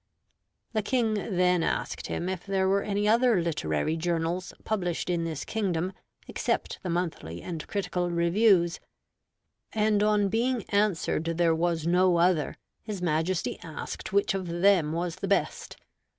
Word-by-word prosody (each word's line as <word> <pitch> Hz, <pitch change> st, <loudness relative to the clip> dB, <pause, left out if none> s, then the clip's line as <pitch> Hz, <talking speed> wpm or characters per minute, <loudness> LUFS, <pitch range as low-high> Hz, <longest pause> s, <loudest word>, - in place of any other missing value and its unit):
The 215 Hz, -, +1 dB
King 225 Hz, 0 st, +1 dB
then 180 Hz, -4 st, +1 dB
asked -, -, -2 dB
him 175 Hz, -, -3 dB
if 185 Hz, -2 st, -3 dB
there 195 Hz, -1 st, 0 dB
were 200 Hz, +1 st, +3 dB
any 205 Hz, 0 st, -1 dB
other 230 Hz, -1 st, +4 dB
literary 155 Hz, -, -1 dB
journals 170 Hz, +2 st, -1 dB
published 180 Hz, -4 st, -1 dB
in 170 Hz, -1 st, 0 dB
this 160 Hz, -3 st, -4 dB
kingdom 185 Hz, -4 st, -1 dB, 0.3 s
except -, -, -2 dB
the 185 Hz, -, -4 dB
Monthly 165 Hz, -, -3 dB
and 165 Hz, -4 st, -6 dB
Critical 180 Hz, -3 st, -1 dB
Reviews; 170 Hz, +1 st, +3 dB, 0.9 s
and 210 Hz, -1 st, +2 dB
on 210 Hz, -1 st, +3 dB
being 235 Hz, +2 st, 0 dB
answered 200 Hz, -5 st, +1 dB
there 165 Hz, 0 st, +2 dB
was 165 Hz, -1 st, 0 dB
no 180 Hz, +1 st, +4 dB
other, 170 Hz, -3 st, +2 dB, 0.3 s
his 210 Hz, -3 st, -5 dB
Majesty 165 Hz, +1 st, -1 dB
asked 160 Hz, -2 st, -7 dB
which 200 Hz, 0 st, +2 dB
of 190 Hz, -2 st, -3 dB
them 175 Hz, -2 st, +3 dB
was 170 Hz, +1 st, -2 dB
the 195 Hz, -, -4 dB
best. 200 Hz, -, -1 dB
180 Hz, 145 wpm, -28 LUFS, 170-200 Hz, 0.9 s, other